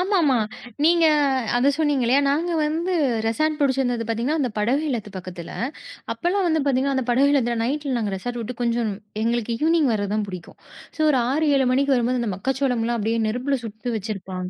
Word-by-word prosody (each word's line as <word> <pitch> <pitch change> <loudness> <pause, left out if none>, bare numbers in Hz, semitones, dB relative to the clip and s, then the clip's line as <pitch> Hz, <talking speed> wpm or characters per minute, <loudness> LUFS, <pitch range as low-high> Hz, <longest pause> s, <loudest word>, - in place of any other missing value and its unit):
ஆமா, 390 +2 +1
ஆமா. 275 -4 +3 0.5
நீங்க 335 0 +4 0.5
அதை 255 +3 +3
சொன்னிங்க. 290 -5 +1
இல்லையா? 265 +4 +4
நாங்க 330 +5 0
வந்து 330 +5 -1 0.3
ரெசார்ட் 310 +6 0
பிடிச்சிருந்தது 260 -4 +1
பார்த்திங்கன்னா, 240 +8 0
அந்த 255 - 0
படகு 245 +8 +1
இல்லத்து 220 -6 -3
பக்கத்தில. 180 -2 -8 0.6
அப்போல்லாம் 365 +2 0
வந்து 320 -1 +2
பார்த்திங்கன்னா, 270 0 +1
அந்த 260 - -1
படகு 270 +4 +4
இல்லத்தில 240 -4 +1
நைட்டில, 280 +2 -2
நாங்க 210 -3 -2
ரெசார்ட் 240 +5 -5
விட்டு 240 +3 -5
கொஞ்சம் 235 -2 0 0.3
எங்களுக்கு 235 0 0
ஈவ்னிங் 320 -4 +3
வரது 205 -2 -2
தான் 215 - 0
பிடிக்கும். 180 -2 -9 0.4
ஸோ - - -1
ஒரு 265 -4 +3
6, 310 +3 +1
7 265 -2 +2
மணிக்கு 275 +2 +2
வரும்போது, 245 +1 +1
அந்த 225 -4 -1
மக்காச்சோளம்லாம் 245 0 -1
அப்படியே 225 +2 0
நெருப்பில 255 +5 -1
சுட்டு 225 +2 -6
வச்சிருப்பாங்க.. 190 -3 -5
250 Hz, 180 wpm, -23 LUFS, 225-285 Hz, 0.6 s, நீங்க